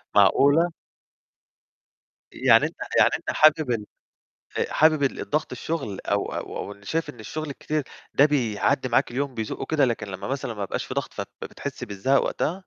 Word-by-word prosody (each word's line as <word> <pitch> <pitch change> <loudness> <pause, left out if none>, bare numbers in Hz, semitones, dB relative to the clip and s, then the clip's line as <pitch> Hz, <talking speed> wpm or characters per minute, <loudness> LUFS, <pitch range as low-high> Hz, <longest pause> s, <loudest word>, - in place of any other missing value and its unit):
معقولة؟ 145 - +5 1.6
يعني - - +5
أنت - - -5 0.2
يعني - - +7
أنت - - -4
حابب 155 -3 +4
ال 110 -3 -1 0.7
آآ - - -1
حابب 155 -1 +4
الضغط 145 +2 -1
الشُغل، 135 -12 -4
أو 100 0 +1
أو 100 - -5
أو 100 - -15
شايف 165 +11 -2
إن 120 - -15
الشُغل 155 +7 -5
الكتير 150 +2 -2 0.3
ده 140 - +6
بيعدّي 130 -1 +1
معاك 120 - +2
اليوم، 135 +2 -2
بيزقه 110 -2 -4
كده، 155 -3 +3
لكن 115 -4 -1
لمّا 95 +3 -6
مثلًا 130 -3 -3
ما 105 - -5
يبقاش 100 - -3
في - - -6
ضغط، - - -3
فبتحس - - -6
بالزهق 105 +7 +1
وقتها؟ 155 - 0
135 Hz, 160 wpm, -25 LUFS, 110-150 Hz, 1.6 s, يعني